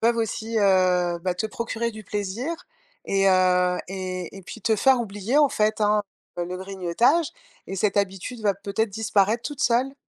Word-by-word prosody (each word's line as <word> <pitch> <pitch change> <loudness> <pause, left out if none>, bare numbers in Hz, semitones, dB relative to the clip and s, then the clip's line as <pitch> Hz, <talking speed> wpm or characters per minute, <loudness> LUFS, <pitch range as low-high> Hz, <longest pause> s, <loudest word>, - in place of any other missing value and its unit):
peuvent 235 +1 +3
aussi, 225 0 -2
heu, 185 -3 +3
bah, 180 0 -1
te 220 +4 -2
procurer 235 +1 -3
du 215 -1 -10
plaisir 210 - -3 0.5
et, 195 0 +2
heu, 180 -1 +3
et 185 -1 -5
et 195 - -10
puis 220 +5 -10
te 225 -2 +2
faire 260 +4 +4
oublier 210 +4 -1
en 295 -2 +5
fait, 215 -1 0
hein, 210 0 +3 0.4
heu, 175 - 0
le 180 +1 -5
grignotage 195 - +1 0.4
et 195 - -5
cette 205 +1 0
habitude 200 +4 -2
va 205 -2 +2
peut-être 200 +3 -2
disparaître 215 +1 +1
toute 290 -2 -6
seule. 250 +3 +2
205 Hz, 180 wpm, -24 LUFS, 185-230 Hz, 0.5 s, en